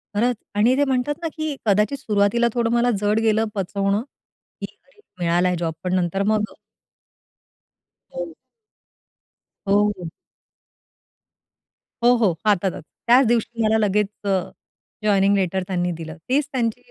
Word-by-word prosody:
खरंच 240 +4 +2 0.2
आणि 225 +5 +4
ते 285 - +4
म्हणतात 265 +2 0
ना 330 - -1
की 310 -2 -2
कदाचित 210 +6 +2
सुरुवातीला 220 -1 +2
थोडं 235 -2 0
मला 240 +1 +3
जड 210 +1 +2
गेलं 220 0 +2
पचवणं 200 +1 0
की, 270 - -13 0.2
अरे - - -28 0.2
मिळालाय 175 +1 +2
जॉब 165 -2 -2
पण 180 0 -1
नंतर 185 +2 0
मग 215 -1 +2 1.7
हो. 175 -2 -5 1.3
हो, 200 - +4 0.3
हो. 175 - -5 1.9
हो, 240 +1 +6
हो, 220 -6 +3
हातातच. 195 -3 +1 0.2
त्याच 250 +2 +6
दिवशी 230 0 0
मला 220 +1 +3
लगेच 210 -1 +2 0.2
अ, - - -2 0.8
जॉइनिंग 200 -1 +3
लेटर 190 -1 0
त्यांनी 180 -1 -1
दिलं. 160 -1 -7
तीच 275 +3 +2
त्यांची 245 -1 -2
210 Hz, 130 wpm, -22 LUFS, 190-240 Hz, 1.9 s, हो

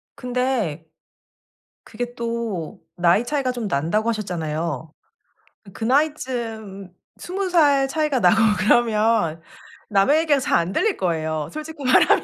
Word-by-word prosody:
근데 245 - -2 1.0
그게 245 +2 -6
또 230 -8 -4
나이 175 +5 +3
차이가 275 -1 -1
좀 240 -4 -4
난다고 185 +9 0
하셨잖아요. 165 - -3 0.8
그 - - -7
나이쯤 235 - -2 0.3
20 375 +1 -4
살 285 -6 +4
차이가 300 -1 0
나고 220 - +5 0.2
그러면 215 -6 +2 0.5
남의 205 +9 +3
얘기가 300 -4 +2
잘 255 - +1
안들릴 195 - 0
거예요. 160 -4 -2
솔직히 310 -1 -8
말하면. 255 - +4
230 Hz, 245 characters per minute, -22 LUFS, 175-270 Hz, 1.0 s, 나고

